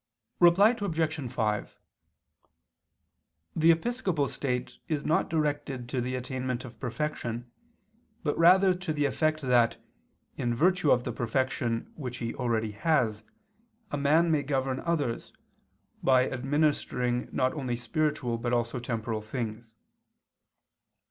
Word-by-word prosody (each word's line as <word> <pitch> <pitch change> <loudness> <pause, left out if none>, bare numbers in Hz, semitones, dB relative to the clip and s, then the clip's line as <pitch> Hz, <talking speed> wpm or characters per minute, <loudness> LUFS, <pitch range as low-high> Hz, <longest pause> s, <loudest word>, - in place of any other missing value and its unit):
Reply 180 +5 +7
Obj. 160 -8 -1
5: 105 -4 -2 1.8
The 160 +1 +4
episcopal 180 - 0
state 125 -3 -3
is 155 -3 -2
not 160 - +2
directed 145 -5 -1
to 125 -1 -1
the 125 +1 -2
attainment 130 0 -3
of 120 - -12
perfection, 120 -3 -3 0.7
but 145 -3 0
rather 185 +3 +6
to 180 -3 -3
the 145 -1 +1
effect 155 +3 +1
that, 125 -3 +3 0.6
in 120 -1 0
virtue 180 +2 +3
of 125 -2 +4
the 125 - -3
perfection 120 0 -1
which 125 -5 -6
he 115 -1 -3
already 115 -4 -1
has, 110 -3 +1 0.7
a 145 - -1
man 160 +4 +3
may 155 -2 +3
govern 135 -2 -1
others, 150 -9 -2 0.7
by 130 -1 +4
administering 130 -2 0
not 130 -1 +1
only 130 -5 -2
spiritual 130 -2 -1
but 120 +1 -1
also 120 +1 0
temporal 115 -2 -3
things. 110 0 -5
130 Hz, 120 wpm, -28 LUFS, 120-155 Hz, 1.8 s, Reply